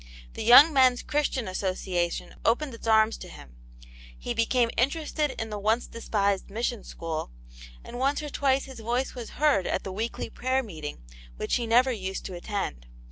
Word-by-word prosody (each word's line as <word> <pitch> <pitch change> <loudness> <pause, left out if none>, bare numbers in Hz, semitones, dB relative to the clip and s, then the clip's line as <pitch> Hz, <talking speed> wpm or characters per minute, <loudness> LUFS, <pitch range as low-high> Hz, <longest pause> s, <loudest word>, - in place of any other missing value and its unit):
The - - -6
Young 275 +8 +9
Men's 255 -2 +4
Christian 290 -6 -1
Association 185 -2 -2
opened 255 +4 +1
its 230 - -9
arms 220 0 +4
to - - -9
him; 65 -4 -13 0.6
he - - -4
became 230 +1 +2
interested 295 +2 0
in 225 -1 -4
the 210 - -4
once 220 +4 +1
despised 200 -4 -1
Mission 230 +2 -2
School, 160 - -5 0.5
and 245 - -8
once 280 +3 +1
or 295 - -4
twice 270 -1 +1
his 265 -3 -10
voice 240 +4 -1
was 240 -3 -8
heard 290 -11 +3
at - - -1
the 190 - -5
weekly 220 +5 -4
prayer 260 +1 0
meeting, 155 - -8 0.3
which - - 0
he 235 -2 -3
never 250 +3 +4
used 190 -4 -4
to 190 - -6
attend. 175 - -4
230 Hz, 175 wpm, -27 LUFS, 195-260 Hz, 0.6 s, Young